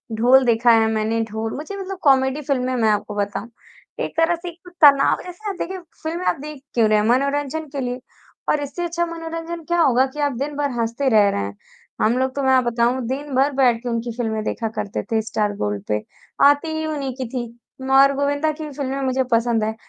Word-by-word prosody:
ढोल 250 Hz, +4 st, +5 dB
देखा 235 Hz, 0 st, +4 dB
है 225 Hz, -1 st, +5 dB
मैंने 220 Hz, +1 st, 0 dB
ढोल 220 Hz, +1 st, -3 dB
मुझे 310 Hz, +7 st, -6 dB
मतलब 390 Hz, 0 st, -5 dB
कॉमेडी 265 Hz, 0 st, +3 dB
फ़िल्में 255 Hz, -3 st, -1 dB
मैं 225 Hz, -3 st, +2 dB
आपको 210 Hz, 0 st, -1 dB
बताऊँ। 205 Hz, +2 st, -3 dB, 0.5 s
एक -, -, -3 dB
तरह 330 Hz, +1 st, +3 dB
से 345 Hz, +1 st, -7 dB
एक 340 Hz, 0 st, -14 dB
तो -, -, -10 dB
तनाव 280 Hz, -2 st, +6 dB
जैसा 360 Hz, +3 st, -10 dB
ना -, -, 0 dB
आप 390 Hz, -, -7 dB
देखिए 380 Hz, +2 st, -3 dB, 0.3 s
फ़िल्में 335 Hz, +3 st, -3 dB
आप -, -, +1 dB
देख 300 Hz, -2 st, -8 dB
क्यों 230 Hz, -2 st, +3 dB
रहे 215 Hz, -, +4 dB
हैं? 210 Hz, -, +1 dB
मनोरंजन 280 Hz, +5 st, 0 dB
के -, -, -1 dB
लिए 250 Hz, 0 st, -3 dB, 0.5 s
और 300 Hz, -, +2 dB
इससे 285 Hz, +5 st, -5 dB
अच्छा 345 Hz, 0 st, -1 dB
मनोरंजन 330 Hz, 0 st, -6 dB
क्या 345 Hz, +1 st, 0 dB
होगा 260 Hz, -4 st, +4 dB
कि 300 Hz, -, -8 dB
आप 290 Hz, -1 st, +1 dB
दिन 285 Hz, +3 st, -3 dB
भर 285 Hz, -1 st, -1 dB
हँसते 235 Hz, +4 st, 0 dB
रह 210 Hz, -4 st, +5 dB
रहें। 100 Hz, -, -2 dB, 0.5 s
हम 230 Hz, +3 st, +3 dB
लोग 260 Hz, +1 st, -1 dB
तो 280 Hz, -, -1 dB
मैं 265 Hz, 0 st, +4 dB
आप 255 Hz, -1 st, +4 dB
बताऊँ 240 Hz, +2 st, +1 dB
दिन 280 Hz, +3 st, -4 dB
भर 275 Hz, +2 st, +3 dB
बैठ 245 Hz, -4 st, +3 dB
के 245 Hz, -, -3 dB
उनकी 235 Hz, 0 st, -2 dB
फ़िल्में 220 Hz, -2 st, -2 dB
देखा 225 Hz, +1 st, -2 dB
करते 200 Hz, -, -3 dB
थे 220 Hz, -1 st, +2 dB
स्टार 210 Hz, -1 st, -1 dB
गोल्ड 105 Hz, -1 st, -2 dB
पे। 105 Hz, 0 st, -1 dB, 0.4 s
आती 290 Hz, +3 st, +4 dB
ही 315 Hz, -, -2 dB
उन्हीं 285 Hz, -4 st, -3 dB
की -, -, -1 dB
थी 240 Hz, 0 st, -4 dB, 0.5 s
और 275 Hz, +1 st, +6 dB
गोविंदा 285 Hz, +2 st, 0 dB
की 310 Hz, +1 st, -8 dB
भी 300 Hz, -, -6 dB
फ़िल्में 275 Hz, -1 st, -2 dB
मुझे 260 Hz, 0 st, +1 dB
पसंद 230 Hz, -1 st, +2 dB
है, 220 Hz, +1 st, -2 dB
265 Hz, 225 wpm, -21 LUFS, 230-300 Hz, 0.5 s, तनाव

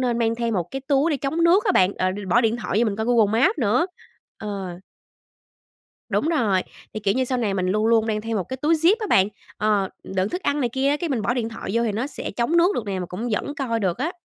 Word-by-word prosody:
nên 240 Hz, -2 st, 0 dB
mang 230 Hz, 0 st, +1 dB
thêm 230 Hz, -1 st, -2 dB
một 175 Hz, -2 st, -2 dB
cái 270 Hz, -, -4 dB
túi 280 Hz, +4 st, +1 dB
để 290 Hz, -, +1 dB
chống 305 Hz, +6 st, -1 dB
nước 370 Hz, +7 st, +5 dB
á 385 Hz, -, +2 dB
bạn, 185 Hz, +2 st, +3 dB
ờ, 185 Hz, -, 0 dB, 0.2 s
bỏ 240 Hz, -, +5 dB
điện 225 Hz, 0 st, +1 dB
thoại 215 Hz, -3 st, -2 dB
vô 240 Hz, -, +3 dB
mình 200 Hz, -, -4 dB
coi 220 Hz, +1 st, -2 dB
Google 225 Hz, -2 st, +3 dB
Maps 365 Hz, +1 st, +3 dB
nữa. 245 Hz, -, +2 dB, 0.5 s
Ờ. 195 Hz, -4 st, -5 dB, 1.3 s
Đúng 310 Hz, -, 0 dB
rồi, 215 Hz, -, +2 dB, 0.3 s
thì, 215 Hz, -, -4 dB
kiểu 200 Hz, -1 st, +1 dB
như, 260 Hz, 0 st, +1 dB
sau 255 Hz, 0 st, -1 dB
này 205 Hz, -4 st, 0 dB
mình 185 Hz, -1 st, -1 dB
luôn 215 Hz, +4 st, +1 dB
luôn 225 Hz, -1 st, +3 dB
mang 215 Hz, -1 st, -1 dB
theo 225 Hz, 0 st, -3 dB
một 185 Hz, -, -1 dB
cái 260 Hz, -, -4 dB
túi 300 Hz, +5 st, +2 dB
zip 335 Hz, +6 st, +4 dB
á 430 Hz, -, -2 dB
bạn. 195 Hz, -, +4 dB, 0.3 s
Ờ, 205 Hz, -3 st, +1 dB, 0.2 s
đựng 190 Hz, +1 st, -1 dB
thức 360 Hz, -, -4 dB
ăn 285 Hz, +1 st, 0 dB
này 245 Hz, -, +1 dB
kia 265 Hz, +3 st, 0 dB
á, 290 Hz, -, +2 dB
cái, 340 Hz, +1 st, -3 dB
mình 245 Hz, -6 st, -1 dB
bỏ 240 Hz, -, 0 dB
điện 230 Hz, -3 st, -1 dB
thoại 225 Hz, -, -7 dB
vô 235 Hz, +1 st, +2 dB
thì 215 Hz, -, 0 dB
nó 230 Hz, +6 st, -2 dB
sẽ 290 Hz, -, -6 dB
chống 235 Hz, +11 st, 0 dB
nước 355 Hz, +4 st, +4 dB
được 220 Hz, -, -3 dB
nè 195 Hz, -2 st, -2 dB
mà 180 Hz, -, -4 dB
cũng 215 Hz, +8 st, -5 dB
vẫn 285 Hz, +7 st, -2 dB
coi 235 Hz, -6 st, -2 dB
được 185 Hz, +1 st, -1 dB
á. 310 Hz, +6 st, -1 dB
230 Hz, 280 wpm, -23 LUFS, 205-275 Hz, 1.3 s, nước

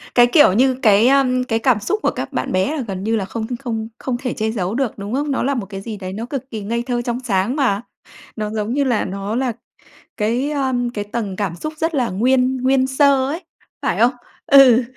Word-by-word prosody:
Cái 240 Hz, -1 st, +7 dB
kiểu 295 Hz, -, +6 dB
như 260 Hz, +5 st, +3 dB
cái, 215 Hz, 0 st, +5 dB
a, 275 Hz, +1 st, +5 dB, 0.2 s
cái 225 Hz, -2 st, 0 dB
cảm 235 Hz, -2 st, +2 dB
xúc 415 Hz, -, -1 dB
của -, -, +2 dB
các -, -, -6 dB
bạn -, -, -2 dB
bé 190 Hz, +12 st, +1 dB
là -, -, -2 dB
gần 190 Hz, -1 st, -5 dB
như 225 Hz, +2 st, 0 dB
là 205 Hz, -3 st, -1 dB
không 220 Hz, +3 st, -4 dB
không 225 Hz, -4 st, -4 dB
không 255 Hz, -2 st, -2 dB
thể 250 Hz, -1 st, -3 dB
che 220 Hz, 0 st, -1 dB
giấu 200 Hz, -2 st, -2 dB
được, 265 Hz, -3 st, -1 dB
đúng 200 Hz, +2 st, -6 dB
không? 285 Hz, +2 st, -1 dB
Nó 270 Hz, -, 0 dB
là 280 Hz, -, +1 dB
một 235 Hz, -6 st, -3 dB
cái 195 Hz, 0 st, -8 dB
gì 215 Hz, +1 st, -6 dB
đấy 185 Hz, -1 st, -6 dB
nó 220 Hz, +4 st, -4 dB
cực 265 Hz, +1 st, -6 dB
kỳ 220 Hz, -3 st, -5 dB
ngây 230 Hz, +4 st, -2 dB
thơ, 245 Hz, -1 st, -1 dB
trong 240 Hz, 0 st, -3 dB
sáng 225 Hz, -1 st, 0 dB
mà. 245 Hz, -9 st, +1 dB, 0.5 s
Nó 215 Hz, -1 st, -3 dB
giống 215 Hz, +1 st, -2 dB
như 285 Hz, +1 st, +1 dB
là 245 Hz, -5 st, +1 dB
nó 200 Hz, +3 st, -4 dB
là 250 Hz, -1 st, 0 dB, 0.6 s
cái, 240 Hz, +7 st, 0 dB
a, 270 Hz, -3 st, -1 dB, 0.2 s
cái 205 Hz, -, -3 dB
tầng 205 Hz, -2 st, -4 dB
cảm 190 Hz, -4 st, -2 dB
xúc 310 Hz, -, -5 dB
rất 325 Hz, +2 st, -1 dB
là 250 Hz, -4 st, +1 dB
nguyên 255 Hz, +6 st, +2 dB
nguyên 260 Hz, +1 st, +2 dB
sơ 265 Hz, 0 st, +3 dB
ấy, 330 Hz, +5 st, -4 dB, 0.4 s
phải -, -, -1 dB
không? 240 Hz, +2 st, +5 dB, 0.3 s
Ừ, 260 Hz, -3 st, +7 dB
240 Hz, 240 wpm, -19 LUFS, 210-265 Hz, 0.6 s, Cái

